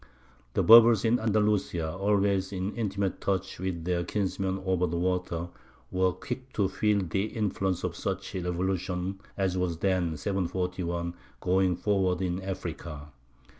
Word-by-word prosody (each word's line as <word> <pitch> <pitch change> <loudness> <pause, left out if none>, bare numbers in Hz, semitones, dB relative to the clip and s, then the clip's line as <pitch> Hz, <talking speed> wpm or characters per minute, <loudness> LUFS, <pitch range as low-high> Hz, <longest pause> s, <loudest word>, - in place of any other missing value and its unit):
The - - +3
Berbers 115 -1 +8
in 115 +2 +3
Andalusia, 105 -7 +1
always 100 0 +1
in 95 +1 -3
intimate 100 -4 -2
touch 95 -2 -1
with 90 -3 -3
their 90 -1 0
kinsmen 95 0 -1
over 90 -1 +2
the 85 +1 -2
water, 90 -1 -1 0.4
were 95 0 +2
quick 130 +5 -6
to 100 -2 +2
feel 100 +1 +1
the 95 +4 0
influence 95 -4 -1
of - - -2
such - - -4
a 95 - -2
revolution 90 +1 -2 0.2
as 95 -2 0
was 90 -2 -1
then 90 -3 0
(741) 90 -2 -2 0.3
going 95 0 +2
forward 95 -1 +1
in 90 0 -1
Africa. 85 -5 -6
95 Hz, 140 wpm, -28 LUFS, 90-100 Hz, 0.4 s, Berbers